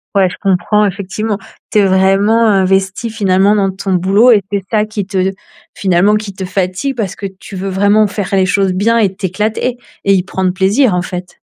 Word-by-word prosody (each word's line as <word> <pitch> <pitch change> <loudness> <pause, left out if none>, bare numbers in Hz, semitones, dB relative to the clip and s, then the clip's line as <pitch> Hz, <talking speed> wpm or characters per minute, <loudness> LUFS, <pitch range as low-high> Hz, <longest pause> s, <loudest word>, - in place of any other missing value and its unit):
Ouais, 190 -2 +4
je - - -8
comprends 195 +2 +2
effectivement. 200 +2 -3 0.3
Tu 215 - +1
es 200 - +4
vraiment 195 +4 +3
investi, 195 +2 +1
finalement, 200 -1 +2
dans 195 -2 +1
ton 190 0 -3
boulot 195 +7 +4
et 210 - +4
c'est 200 -1 -1
ça 215 -1 +1
qui 210 -2 -4
te 190 -1 -1 0.4
finalement 195 +2 +2
qui 210 -2 -4
te 190 - -7
fatigue, 185 +8 -2
parce 200 -5 -3
que 200 - -7
tu 195 - -10
veux 195 +1 -4
vraiment 205 +3 +3
faire 200 -1 -4
les 190 -1 +3
choses 195 0 +1
bien 220 +5 +1
et 195 -4 +1
t'éclater 215 +6 -2 0.3
et 195 - +3
y 185 -2 +2
prendre 190 0 -1
plaisir, 195 +5 +2
en 180 - 0
fait. 180 -1 -7
195 Hz, 200 wpm, -14 LUFS, 190-210 Hz, 0.4 s, Ouais